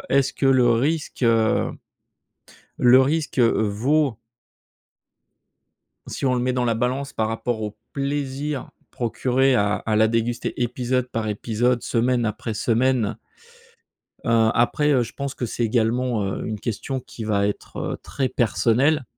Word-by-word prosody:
est-ce 135 -1 +3
que 135 - -1
le 125 -2 +4
risque, 145 +4 -1
heu, 115 -2 +2 1.1
le 125 +1 +7
risque 150 0 -1
vaut 115 +4 +2 1.9
si - - -5
on 125 - +2
le 125 - 0
met 125 +1 0
dans 125 -1 0
la 115 -1 +1
balance 130 +4 -2
par 110 0 -1
rapport 115 0 -2
au 105 0 -5 0.2
plaisir 140 0 -3 0.2
procuré 130 +2 +1
à 105 -2 +2
à 110 -1 -1
la 110 0 +4
déguster 115 +1 -1
épisode 125 +1 -1
par 110 -2 -3
épisode 115 +3 0
semaine 120 +1 +1
après 110 +1 -4
semaine 115 -1 +1 1.1
heu, 115 -1 +3
après, 145 +5 +2
heu, 125 -3 +3
je 115 - -6
pense 140 -1 -5
que 120 - -3
c'est 120 - -2
également, 115 -1 +1
heu, 95 - -3
une 110 -2 -4
question 130 +4 -3
qui 120 -2 -9
va 100 -2 +1
être, 105 - -6 0.2
heu, - - -4
très 130 -2 -2
personnelle. 130 +4 +2
120 Hz, 145 wpm, -23 LUFS, 110-130 Hz, 1.9 s, le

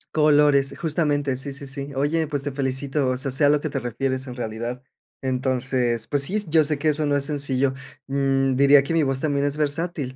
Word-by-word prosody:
Colores, 145 -2 +3
justamente. 145 -4 0
Sí, 140 +1 -5
sí, 140 +1 -6
sí. 140 +1 -5
Oye, 155 +4 0
pues, 145 -2 -3
te 145 - -3
felicito. 135 +1 -1
O 130 - -1
sea, 135 +1 -2
sé 140 +3 +3
a - - +5
lo 150 0 +3
que 155 - -3
te 135 - -2
refieres 130 +2 -3
en 125 - -7
realidad. 120 +1 -5 0.4
Entonces, 130 -2 0
pues, 145 -1 +1
sí, 185 +10 +2
yo 160 0 +4
sé 150 0 +1
que 155 +2 +1
eso 150 0 0
no 145 - +1
es 140 - -1
sencillo. 140 -2 -1 0.3
Mm, 135 -1 +1
diría 140 +1 +6
que 150 - -3
mi 165 - +3
voz 135 -2 0
también 145 -2 0
es 145 +1 -1
versátil, 150 -2 -2
140 Hz, 220 wpm, -23 LUFS, 130-145 Hz, 0.4 s, diría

